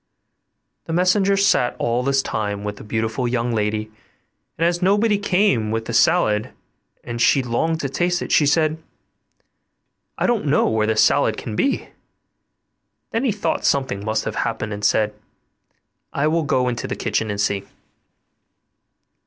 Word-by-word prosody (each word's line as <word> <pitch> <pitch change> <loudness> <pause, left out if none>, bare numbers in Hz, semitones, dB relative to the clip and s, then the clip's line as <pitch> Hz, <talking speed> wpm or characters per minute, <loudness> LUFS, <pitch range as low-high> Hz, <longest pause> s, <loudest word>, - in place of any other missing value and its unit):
The 165 - -4
messenger 190 +3 +3
sat 195 -11 +2
all 120 +1 0
this 135 +1 +1
time 105 -1 -3
with 105 0 -5
the - - -10
beautiful 110 +3 -2
young 120 0 -1
lady, 110 0 -2 0.7
and 165 - +1
as 175 +1 0
nobody 205 +3 +2
came 180 - +1
with 115 +1 -2
the 120 - -5
salad 110 -6 +3 0.5
and 120 0 -5
she 135 +2 +4
longed 160 +7 -1
to 140 - -1
taste 175 +5 0
it, - - -6
she 150 - +4
said, 155 +1 +1 1.4
'I - - 0
don't 235 -9 0
know 140 - +3
where 110 -1 +1
the 110 - +1
salad - - +3
can 110 - -6
be.' 275 - 0 1.2
Then 230 - -1
he 245 - +2
thought 205 0 -2
something 130 -8 0
must 110 +1 -1
have - - -4
happened, 105 0 -2
and 105 0 -7
said, 105 +1 +2 1.0
'I 140 +2 +1
will 165 +1 +1
go 130 -2 +1
into 120 -1 -3
the - - -3
kitchen 110 - -1
and 100 0 -3
see. 100 -1 -1
125 Hz, 160 wpm, -21 LUFS, 110-170 Hz, 1.4 s, she